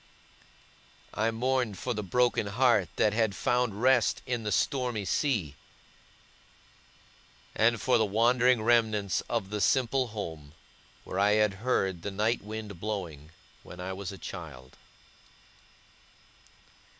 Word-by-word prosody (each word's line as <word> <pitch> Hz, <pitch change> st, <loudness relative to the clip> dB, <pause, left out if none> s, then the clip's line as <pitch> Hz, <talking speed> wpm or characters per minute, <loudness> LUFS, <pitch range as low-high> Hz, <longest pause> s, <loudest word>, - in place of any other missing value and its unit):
I 110 Hz, +1 st, +1 dB
mourned 120 Hz, -2 st, -1 dB
for 125 Hz, -, -3 dB
the 105 Hz, -, -3 dB
broken 120 Hz, +2 st, +1 dB
heart 110 Hz, -4 st, +2 dB
that 105 Hz, -, +2 dB
had 110 Hz, -3 st, +1 dB
found 120 Hz, -3 st, 0 dB
rest 130 Hz, -3 st, +3 dB
in 125 Hz, -2 st, -2 dB
the 105 Hz, -1 st, -3 dB
stormy 125 Hz, -2 st, 0 dB
sea; 100 Hz, -, 0 dB, 2.0 s
and 115 Hz, +1 st, +2 dB
for 125 Hz, 0 st, +2 dB
the 110 Hz, -, +3 dB
wandering 120 Hz, +3 st, +3 dB
remnants 110 Hz, -, +2 dB
of 100 Hz, -4 st, -2 dB
the 105 Hz, -1 st, -2 dB
simple 130 Hz, +1 st, +2 dB
home, 80 Hz, -9 st, -7 dB, 0.5 s
where 95 Hz, -, -4 dB
I 100 Hz, +1 st, +4 dB
had 105 Hz, -1 st, +3 dB
heard 95 Hz, -8 st, 0 dB
the 100 Hz, -, -4 dB
night 110 Hz, +4 st, 0 dB
wind 105 Hz, -3 st, -7 dB
blowing, 85 Hz, -8 st, -5 dB, 0.3 s
when 90 Hz, -, -12 dB
I 95 Hz, +1 st, -4 dB
was 95 Hz, 0 st, -6 dB
a 100 Hz, -, -9 dB
child. 75 Hz, -10 st, -9 dB
110 Hz, 125 wpm, -29 LUFS, 95-120 Hz, 2.0 s, I